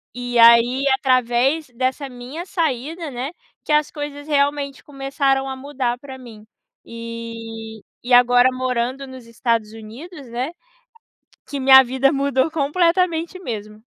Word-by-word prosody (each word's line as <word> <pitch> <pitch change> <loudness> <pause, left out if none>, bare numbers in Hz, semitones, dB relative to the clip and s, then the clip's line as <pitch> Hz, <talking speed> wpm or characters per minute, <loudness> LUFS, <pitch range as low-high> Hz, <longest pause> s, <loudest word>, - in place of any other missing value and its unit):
E 245 -1 -3
aí 235 +3 +6
através 260 +3 +1
dessa 260 +3 -2
minha 255 +8 -8
saída, 320 -1 -2
né, 255 +5 -4 0.3
que - - -5
as 300 0 +3
coisas 290 0 -7
realmente 285 -1 0
começaram 275 -1 -1
a 265 - -4
mudar 260 -3 -3
pra 265 -1 -10
mim, 225 -4 -13 0.4
e 230 -1 -8 0.2
e 245 - -1
agora 245 +1 +6
morando 255 +1 -2
nos 260 -2 -11
Estados 230 -2 -1
Unidos, 255 - -11
né, 250 +6 -3 1.0
que 280 - -5
minha 265 0 +8
vida 265 +3 +1
mudou 275 +1 +1
completamente 335 +3 0
mesmo. 215 - -7
260 Hz, 130 wpm, -21 LUFS, 240-285 Hz, 1.0 s, minha